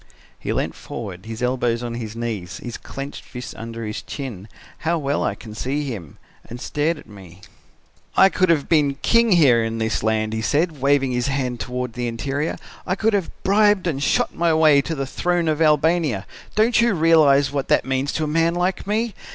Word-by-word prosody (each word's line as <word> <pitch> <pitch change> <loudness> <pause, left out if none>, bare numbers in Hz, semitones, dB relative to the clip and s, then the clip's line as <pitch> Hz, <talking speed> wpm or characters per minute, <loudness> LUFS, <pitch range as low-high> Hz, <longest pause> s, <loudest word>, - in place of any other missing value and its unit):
"He - - -3
leant - - -1
forward, 100 -3 -8
his 115 +1 -5
elbows 125 -2 0
on 120 -1 -4
his 115 -2 -6
knees, 110 -7 -4
his 120 -2 -7
clenched 140 +1 -7
fist 125 0 -8
under 115 0 -6
his 105 0 -4
chin 115 -9 -7 0.3
how 170 +1 0
well 140 -2 -1
I - - -1
can 110 -2 -11
see 135 +7 -2
him! 100 - -7 0.3
and 120 - -7
stared 150 +5 -1
at - - -13
me. 95 -3 -14 0.8
"'I 190 - +7
could 185 -2 +1
have 155 -4 +2
been 145 -4 +3
king 230 -2 +4
here 130 -9 +5
in 115 0 -3
this 110 0 -1
land,' 110 0 0
he 110 - -2
said, 150 +4 0
waving 140 -1 +3
his 125 0 0
hand 130 -3 -2
toward 125 -1 -4
the 120 0 -3
interior, 135 +6 -2 0.3
'I 185 - +1
could 220 +2 +1
have 195 -4 0
bribed 205 0 +3
and 150 -6 -1
shot - - +1
my 170 0 +1
way 155 -3 +5
to 160 +3 -4
the 135 -2 -2
throne 175 +5 0
of 155 0 0
Albania. 155 - +2 0.3
Don't 225 +2 +4
you 235 -4 +3
realize 155 -4 +4
what 140 -2 -2
that - - +3
means 135 +1 -1
to 160 - -1
a - - -1
man 165 +2 +2
like 180 +2 -1
me? 220 +2 0
140 Hz, 200 wpm, -22 LUFS, 115-165 Hz, 0.8 s, I